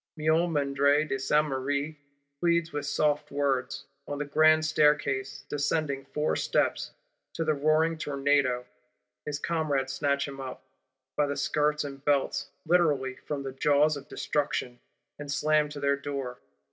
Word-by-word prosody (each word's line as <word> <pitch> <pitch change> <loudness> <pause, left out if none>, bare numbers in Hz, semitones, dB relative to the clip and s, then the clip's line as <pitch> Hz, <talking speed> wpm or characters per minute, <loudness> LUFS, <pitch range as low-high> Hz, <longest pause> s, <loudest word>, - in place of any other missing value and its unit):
Miomandre 150 -2 +2
de 135 - -2
Sainte 150 +3 +2
Marie 140 +3 -2 0.4
pleads 170 -1 +1
with 145 -1 -3
soft 150 0 +1
words, 135 -3 -1 0.2
on 145 - -4
the 145 - -2
Grand 155 +2 +4
Staircase, 150 -4 +1
"descending 145 -1 -1
four 150 +2 -1
steps:"—to - - -2
the 155 - +2
roaring 155 +2 +2
tornado. 140 -4 +1 0.6
His 145 -1 -2
comrades 145 -4 -1
snatch 140 -1 0
him 135 -1 -7
up, 130 -1 -7 0.5
by 150 - +2
the 140 - -3
skirts 150 +1 +1
and 140 -1 -8
belts; 145 -2 +1 0.2
literally, 145 -7 +2
from 145 -2 -3
the 135 - -4
jaws 145 +3 +3
of 140 -1 -9
Destruction; 135 -4 -2 0.4
and 145 -1 -6
slam 150 0 +2
to 145 -1 -7
their 140 0 +1
Door. 140 -3 -5
145 Hz, 140 wpm, -28 LUFS, 140-155 Hz, 0.6 s, Grand